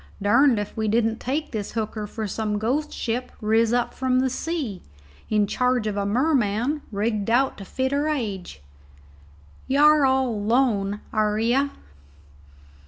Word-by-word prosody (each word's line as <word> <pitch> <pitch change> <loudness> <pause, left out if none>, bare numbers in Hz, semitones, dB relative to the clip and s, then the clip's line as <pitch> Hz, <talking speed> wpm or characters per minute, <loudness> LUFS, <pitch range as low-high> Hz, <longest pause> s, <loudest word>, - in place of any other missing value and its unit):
Durned 235 +5 +4
if 205 -1 -4
we 220 -1 -1
didn't 225 +1 +1
take 290 +5 -3
this 215 -4 -4
hooker 215 -1 -3
for 220 +1 -5
some 210 +1 -2
ghost 265 +8 -1
ship 245 +2 -3
riz 225 +2 +2 0.2
from 255 -1 0
the 260 0 +1
sea, 265 - -3 0.5
in 210 -1 +3
charge 250 +2 0
of 210 -2 -2
a 200 0 -1
merman 250 +2 +1
rigged 210 0 -1
out 260 +3 +2
to 195 - -8
fit 260 +6 -2
her 285 +2 0
age. 205 - -4 1.0
Y' 270 - +1
are 300 0 +6
all 265 -1 +3
alone, 210 -2 0
air 215 -1 +1
you?" 245 +6 +2
230 Hz, 150 wpm, -24 LUFS, 210-265 Hz, 1.0 s, are